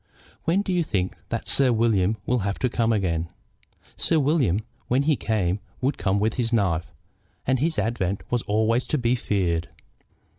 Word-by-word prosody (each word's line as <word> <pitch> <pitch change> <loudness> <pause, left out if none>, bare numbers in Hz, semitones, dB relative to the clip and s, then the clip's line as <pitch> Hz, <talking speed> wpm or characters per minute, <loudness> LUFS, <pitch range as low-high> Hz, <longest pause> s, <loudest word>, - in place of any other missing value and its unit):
When 185 +5 +2
do 190 - -2
you 175 -1 +2
think 95 - -1
that 115 - -3
Sir 135 -2 +4
William 110 -3 +2
will 125 0 +1
have 100 -1 -2
to 125 - 0
come 115 -1 +1
again?" 85 -6 0 0.7
Sir 165 - +2
William, 135 - +2 0.3
when 130 +3 +2
he 150 0 +3
came, 105 -6 0 0.2
would 135 +2 -1
come 100 0 +1
with 110 +2 +1
his 120 -2 0
knife, 85 - +1 0.5
and 130 0 +2
his 160 +4 0
advent 100 -4 -1
was 120 -1 +1
always 110 +4 +2
to 155 - 0
be 120 -2 +1
feared. 90 -7 -1
115 Hz, 175 wpm, -25 LUFS, 95-130 Hz, 0.7 s, Sir